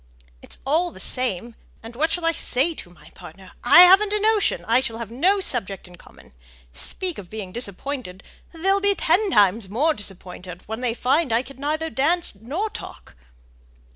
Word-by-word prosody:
"It's - - -10
all 325 +6 +1
the - - -14
same. 235 -3 -2 0.3
And 225 +1 -10
what 310 +6 +1
shall 350 -2 -2
I 330 - +3
say 295 +1 0
to 180 - -11
my 175 - -18
partner? 190 -1 -14
I 295 +8 +9
haven't 385 +3 +7
a 425 - +2
notion: 430 -1 +1
I 230 +3 +3
shall 235 -4 -4
have 230 -2 -7
no 365 +12 +2
subject 200 - -2
in 180 - -14
common. - - -19 0.4
Speak 365 - -4
of 185 -4 -11
being 210 -4 -7
disappointed, 230 -2 -5 0.3
they'll 385 +4 0
be 405 0 +2
ten 390 +5 +1
times 205 - +3
more 290 +10 +1
disappointed 185 - -7
when 220 +3 -6
they 240 -2 -1
find 265 +3 +1
I 230 +2 +2
can 270 +1 -12
neither 310 +3 -2
dance 335 +6 +1
nor 290 - -4
talk!" - - -11
255 Hz, 180 wpm, -22 LUFS, 210-340 Hz, 0.4 s, I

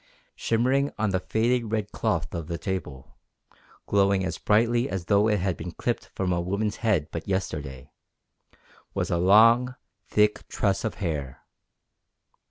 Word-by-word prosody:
Shimmering 130 +5 +1
on 110 -2 0
the 95 - +1
faded 115 +3 0
red 105 -2 -2
cloth - - -1
of 85 -2 -4
the 85 -1 -3
table, 85 -9 -6 0.7
glowing 100 -1 +2
as 85 - -4
brightly 120 +4 +2
as 95 -7 -4
though 100 +4 +3
it 105 -2 +2
had 95 -2 0
been 85 +1 -7
clipped - - -2
from 90 -2 0
a 85 - 0
woman's 100 +4 -2
head 100 -10 +1
but 85 - -6
yesterday, 75 -9 -4 1.0
was - - -1
a 85 - +1
long, 115 +7 +5 0.3
thick 105 0 +2
tress 100 -2 0
of 110 - -2
hair! 75 -9 -4
100 Hz, 150 wpm, -26 LUFS, 85-110 Hz, 1.0 s, long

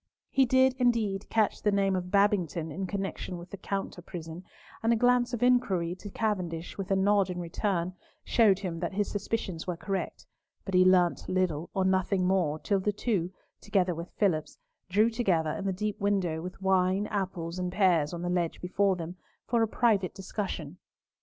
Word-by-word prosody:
He 270 -1 +4
did, 260 +1 +4
indeed, 220 -5 +1
catch 220 -2 +1
the 210 - +2
name 195 -1 +2
of 180 -1 -3
Babington 180 -5 +1
in 190 +5 -4
connection 195 -2 -4
with 175 +1 -11
the 200 - -6
"Counter 195 -2 -4
prison," 170 0 -8 0.4
and 225 - +2
a - - +5
glance 245 +1 +3
of 240 -1 -2
inquiry 200 -9 +2
to 205 - -9
Cavendish, 180 -6 -2
with 195 -2 -5
a 195 - +3
nod 195 0 +3
in 180 -1 -4
return, 175 +1 -1 0.3
showed 215 -5 +4
him 180 -4 -4
that 175 +2 -3
his 205 0 0
suspicions 195 -5 -3
were 180 -2 -2
correct, 195 +2 -4 0.4
but 195 - -5
he 180 0 +6
learnt 185 -2 +3
little 175 -4 0
or 190 -1 +1
nothing 190 0 +2
more 180 -5 +1
till 195 +5 0
the 205 +2 0
two, 195 -4 -1 0.3
together 190 -3 +1
with 170 +1 -7
Phillipps, 170 -7 0 0.3
drew 215 +5 +3
together 180 -10 +1
in 195 - -4
the 195 - +1
deep 210 +2 -3
window, 190 -6 0
with 180 +3 -7
wine, 190 +1 +2
apples, 185 -4 -3
and 180 0 -2
pears 180 -6 +3
on 175 0 -5
the - - -2
ledge 175 -2 -1
before 190 +2 +1
them, 175 +1 -6 0.3
for 235 -1 +1
a 225 - +3
private 210 -5 +1
discussion. 185 -5 -5
190 Hz, 185 wpm, -29 LUFS, 175-205 Hz, 0.4 s, he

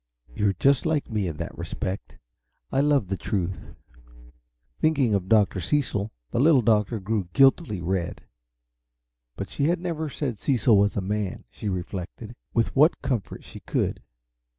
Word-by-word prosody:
You're 100 +4 +1
just 140 - +2
like 150 -6 -1
me 105 -4 0
in 80 -3 -5
that - - -5
respect. 95 +2 -5 0.5
I 135 - +1
love 145 -8 +2
the 95 +1 -2
truth." 95 -2 -3 1.0
Thinking 140 -8 +2
of 95 -2 -1
Dr. 105 -3 +4
Cecil, 105 - -1 0.2
the - - 0
Little 140 -2 +5
Doctor 110 0 +2
grew 100 -2 -2
guiltily 135 - +4
red. 90 0 -2 1.1
But - - -6
she 140 - 0
had 170 +3 +2
never 165 -3 -3
said 130 -7 -3
Cecil 120 -3 +3
was 100 0 +3
a - - +1
man, 100 0 -3
she 105 - -5
reflected, 95 +5 -5 0.2
with 115 -1 0
what 150 +3 +4
comfort 130 -7 -3
she - - -11
could. - - -2
110 Hz, 150 wpm, -25 LUFS, 95-140 Hz, 1.1 s, Little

